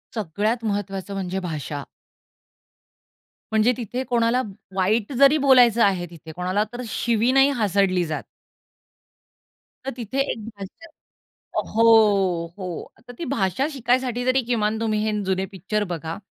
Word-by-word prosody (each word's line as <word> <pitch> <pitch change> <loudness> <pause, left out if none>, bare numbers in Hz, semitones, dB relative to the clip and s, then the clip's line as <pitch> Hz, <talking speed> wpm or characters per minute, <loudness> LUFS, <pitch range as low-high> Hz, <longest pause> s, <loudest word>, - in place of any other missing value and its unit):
सगळ्यात 215 +4 -1
महत्वाचं 200 -1 -4
म्हणजे 190 -1 -3
भाषा. 145 -2 -5 1.7
म्हणजे 220 +3 +4
तिथे 245 +2 -4
कोणाला 240 0 +1 0.3
वाईट 210 +6 +1
जरी 280 +2 +7
बोलायचं 250 -5 +5
आहे, 185 -3 +2
तिथे 160 -1 -11
कोणाला 185 +3 0
तर 245 - -5
शिवी 235 +2 +1
नाही 270 +1 +5
हासडली 200 -7 +1
जात. 155 - -4 1.6
तर 270 - -2
तिथे 245 +2 -4
एक - - -5
भाषा 205 - -11 0.9
हो, 200 -7 +4
हो. 180 -3 -6 0.2
तर 245 - -9
ती 330 - -6
भाषा 250 +2 0
शिकायसाठी 245 -1 0
तरी 255 0 +2
किमान 220 -2 0
तुम्ही 215 -2 0
हे 215 - +1
जुने 190 0 0
पिक्चर 205 +3 -2
बघा. 165 0 -5
215 Hz, 130 wpm, -23 LUFS, 190-245 Hz, 1.7 s, जरी